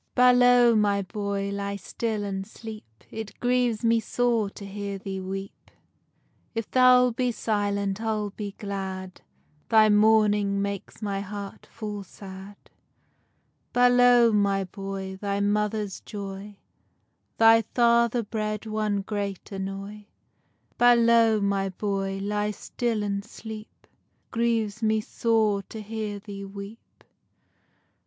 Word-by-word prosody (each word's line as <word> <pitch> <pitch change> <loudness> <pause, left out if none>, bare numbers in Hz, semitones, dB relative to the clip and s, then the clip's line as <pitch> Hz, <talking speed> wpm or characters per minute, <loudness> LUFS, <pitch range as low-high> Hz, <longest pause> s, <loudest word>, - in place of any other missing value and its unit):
BALOW, 245 -1 +6
my 200 -1 +2
boy, 200 0 -3
ly 200 0 -3
still 215 +1 -3
and 195 -1 -4
sleep, 215 - -11
It 220 -1 -7
grieves 245 -2 +1
me 230 0 +4
sore 230 -2 0
to 200 - -10
hear 200 0 -5
thee 190 0 -5
weep, 195 +1 -7 0.9
If 225 -1 -2
thou'lt 250 -1 +5
be 250 0 +1
silent, 205 -2 -1
I'll 215 -2 -1
be 205 0 -6
glad, 190 -2 -5 0.5
Thy 220 -1 +6
mourning 210 -1 +4
makes 200 +2 -4
my 200 -1 -2
heart 200 0 -8
full 210 -2 -6
sad. 195 +1 -11 1.2
Balow, 245 -1 +6
my 200 -2 +2
boy, 195 0 -6
thy 200 0 -2
mother's 210 0 0
joy, 200 0 -8 0.8
Thy 225 0 +7
father 235 +1 +2
bred 215 0 -3
one 215 -2 -1
great 200 -1 -4
annoy. 195 +2 -6 0.7
Balow, 235 -2 +5
my 200 -1 0
boy, 195 0 -2
ly 210 +1 -1
still 220 +1 -2
and 200 -1 -2
sleep, 220 0 -9 0.2
It - - -39 0.4
grieves 225 -2 0
me 220 0 +2
sore 215 -2 +1
to 220 - -7
hear 215 -1 -4
thee 200 -1 -8
weep. 200 +3 -11
210 Hz, 120 wpm, -26 LUFS, 200-225 Hz, 1.2 s, Thy